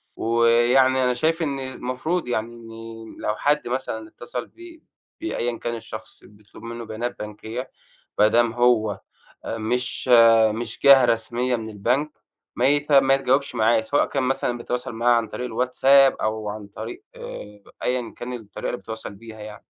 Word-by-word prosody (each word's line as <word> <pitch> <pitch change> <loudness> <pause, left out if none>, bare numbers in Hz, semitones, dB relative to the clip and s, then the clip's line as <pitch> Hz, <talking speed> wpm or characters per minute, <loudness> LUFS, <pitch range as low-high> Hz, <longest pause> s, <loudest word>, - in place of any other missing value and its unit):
ويعني 120 +3 +3
أنا 125 0 +2
شايف 160 +6 0
إن 140 -2 -2
المفروض 130 +5 -3
يعني 120 -1 -2
إن 115 -1 -10
لو 105 - -1
حد 145 0 +1
مثلًا 115 -3 -3
اتصل 120 +1 -7
ب 345 -2 -14 0.4
بأيًا 120 - -2
كان 120 0 -3
الشخص 115 - -9
بيطلب 105 0 -17
منُّه 115 0 -6
بيانات 115 +3 -5
بنكيّة، 110 +4 -6 0.5
بدام 115 +2 +4
هو 115 -5 +2 0.4
آآ 115 - -4
مش 125 +3 -1 0.4
مش 115 0 -5
جهة 135 -2 +8
رسمية 120 +2 0
من 110 -1 -6
البنك 125 +9 0 0.5
ما 125 - +2
يت 145 +1 +1
ما 135 -1 +6
يتجاوبش 135 0 +1
معاه، 110 0 +3
سواء 125 +6 +1
كان 135 - -2
مثلًا 125 -2 -1
بيتواصل 120 0 -4
معاه 120 +2 +2
عن 115 -2 0
طريق 125 +3 -5
الواتساب، 130 +3 +4
أو 110 -1 -2
عن 105 0 -6
طريق 360 - -8 0.8
أيًا 125 -2 -2
كان 125 +1 -6
الطريقة 110 -5 -6
اللي 120 - -2
بيتواصل 110 -2 -8
بيها 110 +1 -12
يعني. 105 0 -8
120 Hz, 155 wpm, -23 LUFS, 110-130 Hz, 0.8 s, جهة